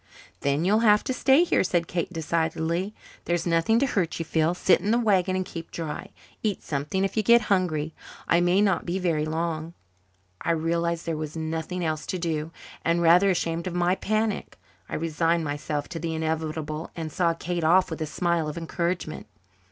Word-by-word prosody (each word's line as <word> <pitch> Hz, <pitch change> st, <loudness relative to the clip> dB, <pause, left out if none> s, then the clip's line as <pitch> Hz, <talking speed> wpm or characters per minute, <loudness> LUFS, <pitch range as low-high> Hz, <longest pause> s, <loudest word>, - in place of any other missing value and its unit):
"Then 140 Hz, +4 st, 0 dB
you'll 210 Hz, +4 st, +4 dB
have 210 Hz, -2 st, +5 dB
to 260 Hz, -, -1 dB
stay 270 Hz, +5 st, +4 dB
here," 355 Hz, -, +2 dB
said 175 Hz, -2 st, +1 dB
Kate 175 Hz, +2 st, -3 dB
decidedly. 165 Hz, +3 st, -1 dB, 0.3 s
"There's 175 Hz, -1 st, 0 dB
nothing 170 Hz, +6 st, +3 dB
to 270 Hz, -, +3 dB
hurt 190 Hz, -10 st, -1 dB
you, 165 Hz, -, -3 dB
Phil. 160 Hz, +2 st, +1 dB
Sit 180 Hz, 0 st, +3 dB
in 200 Hz, -, -2 dB
the 230 Hz, -, +4 dB
wagon 195 Hz, -5 st, +2 dB
and 185 Hz, 0 st, -1 dB
keep 165 Hz, -2 st, -8 dB
dry. 160 Hz, -3 st, -5 dB, 0.3 s
Eat 210 Hz, -3 st, -1 dB
something 150 Hz, +6 st, -2 dB
if 195 Hz, -, -1 dB
you 220 Hz, -, +3 dB
get 235 Hz, +3 st, +6 dB
hungry. 160 Hz, -5 st, 0 dB, 0.3 s
I 170 Hz, -, +4 dB
may 175 Hz, +3 st, +3 dB
not 195 Hz, -5 st, +2 dB
be 175 Hz, +2 st, -2 dB
very 165 Hz, -5 st, 0 dB
long." 165 Hz, +1 st, -3 dB, 0.7 s
I 170 Hz, -, +1 dB
realized 170 Hz, +1 st, 0 dB
that 165 Hz, -, -1 dB
there 160 Hz, -, -2 dB
was 155 Hz, +1 st, -5 dB
nothing 160 Hz, +2 st, -3 dB
else 155 Hz, -1 st, -2 dB
to 185 Hz, -, -2 dB
do; 160 Hz, -2 st, -2 dB, 0.3 s
and, 170 Hz, +1 st, +2 dB
rather 175 Hz, +4 st, +6 dB
ashamed 170 Hz, -1 st, -1 dB
of 180 Hz, -, -4 dB
my 175 Hz, 0 st, +2 dB
panic, 215 Hz, +2 st, -1 dB, 0.3 s
I -, -, -3 dB
resigned 165 Hz, +1 st, +1 dB
myself 145 Hz, 0 st, -3 dB
to 165 Hz, -, -5 dB
the 165 Hz, 0 st, -3 dB
inevitable 160 Hz, 0 st, -3 dB
and 160 Hz, -2 st, -5 dB
saw 170 Hz, -1 st, +1 dB
Kate 175 Hz, 0 st, -3 dB
off 175 Hz, +3 st, +4 dB
with 160 Hz, -, -5 dB
a 155 Hz, -, -1 dB
smile 170 Hz, 0 st, 0 dB
of 150 Hz, -, -5 dB
encouragement. 170 Hz, -1 st, -3 dB
170 Hz, 195 wpm, -26 LUFS, 160-185 Hz, 0.7 s, get